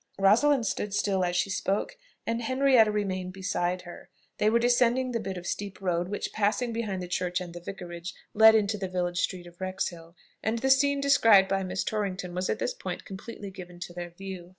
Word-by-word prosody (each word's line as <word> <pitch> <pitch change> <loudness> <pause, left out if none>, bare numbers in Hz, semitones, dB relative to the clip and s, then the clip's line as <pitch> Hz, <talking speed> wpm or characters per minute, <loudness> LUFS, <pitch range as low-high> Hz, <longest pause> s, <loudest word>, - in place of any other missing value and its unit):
Rosalind 230 +7 +4
stood 205 -1 -2
still 195 -2 +1
as 175 0 0
she 185 +2 +1
spoke, 195 +1 -1 0.3
and 230 +1 -1
Henrietta 255 -2 +4
remained 185 -3 -2
beside 185 -2 -1
her. 175 0 -11 0.3
They 210 - +4
were 230 - +4
descending 245 +1 +3
the 230 - -1
bit 195 -3 -4
of 175 - -8
steep 200 0 -4
road 175 -2 0
which, 205 +2 -4
passing 220 +3 0
behind 205 -5 -3
the - - -6
church 180 0 -1
and 175 -2 -7
the 175 - -7
vicarage, 175 -1 -7 0.2
led 220 +1 +8
into 210 -1 +1
the 190 - -2
village 180 -1 -1
street 180 -2 -2
of 175 +1 -15
Wrexhill, 175 -3 -4 0.3
and 220 +2 0
the 265 +3 +2
scene 280 +1 +4
described 225 -8 +6
by 195 0 +1
Miss 185 0 -2
Torrington 195 -4 -3
was 180 +1 -2
at - - 0
this - - -1
point - - -6
completely 200 0 -8
given 180 -2 -10
to 175 - -6
their 175 0 -6
view. 180 0 -8
195 Hz, 205 wpm, -28 LUFS, 180-225 Hz, 0.3 s, led